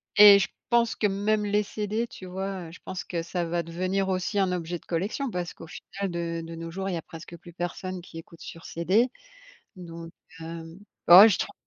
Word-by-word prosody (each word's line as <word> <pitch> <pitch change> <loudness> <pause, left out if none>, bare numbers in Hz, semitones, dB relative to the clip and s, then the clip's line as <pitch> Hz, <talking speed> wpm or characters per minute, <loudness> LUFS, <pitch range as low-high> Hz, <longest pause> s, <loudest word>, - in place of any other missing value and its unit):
et 205 -1 +10
je 195 - +1 0.2
pense 235 -1 +3
que 210 - +1
même 210 +2 0
les 205 +1 +2
CD, 215 +3 -3
tu 190 - -11
vois? 190 -1 -4
Heu, - - -11
je 180 - -13
pense 185 - -5
que 170 -2 -3
ça 175 +1 -2
va 170 +1 -1
devenir 185 +4 -1
aussi 190 +2 -1
un 185 -2 +2
objet 175 -1 -3
de - - -26
collection 205 - -2
parce 180 -1 -4
qu'au 165 - -12
final 195 +3 -6
de 170 -1 -3
de 165 - -8
nos 165 0 -7
jours, 190 +2 -4
il 185 - -2
y - - -1
a 165 - -4
presque 170 +1 -11
plus 175 +1 -14
personne 180 +2 -4
qui 165 - -12
écoute 165 0 -14
sur 165 - -10
CD. 195 +9 +1 0.7
Donc 165 -2 -9 0.3
heu, 165 0 -6 0.4
oh, 180 +4 +12
je 185 -5 +2
trouve - - -3
180 Hz, 220 wpm, -27 LUFS, 170-200 Hz, 0.7 s, oh